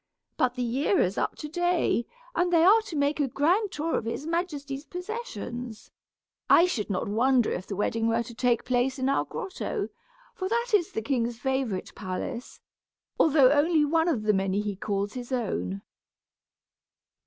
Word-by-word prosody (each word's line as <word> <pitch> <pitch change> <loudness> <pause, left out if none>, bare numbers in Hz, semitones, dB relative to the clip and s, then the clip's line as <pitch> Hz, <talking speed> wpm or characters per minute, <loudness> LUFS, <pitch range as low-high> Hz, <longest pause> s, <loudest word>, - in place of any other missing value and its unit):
But 250 -1 +1
the 250 - -2
year 270 - +1
is 185 +2 +1
up - - -1
to 300 - -6
day, 350 -6 +1 0.3
and 355 -6 +1
they 330 -2 +5
are 420 +5 +7
to 340 - -6
make 285 +1 +1
a 285 - +2
grand 355 - +1
tour 320 -1 -2
of - - -3
his 230 +6 -4
majesty's 300 -5 -3
possessions. 335 - -6 0.6
I 340 - +7
should 230 - -2
not 185 -2 -1
wonder 240 +3 +3
if 185 - -4
the 200 - -4
wedding 225 +3 0
were 230 +1 +1
to 235 - -10
take 240 -1 +1
place 255 +2 +1
in 260 0 -1
our 275 - +1
grotto, 380 - -4 0.4
for 375 0 -4
that 470 +2 0
is 365 -5 +3
the 220 - -2
king's 240 -2 -1
favorite 260 -7 -2
palace, 190 +6 -5 0.6
although 280 -4 +6
only 300 +1 +3
one 325 +2 +2
of 260 -11 0
the 210 0 +3
many 195 0 0
he 205 -1 -3
calls 200 +1 -2
his 250 0 -7
own." 100 - -2
265 Hz, 175 wpm, -27 LUFS, 230-330 Hz, 0.6 s, are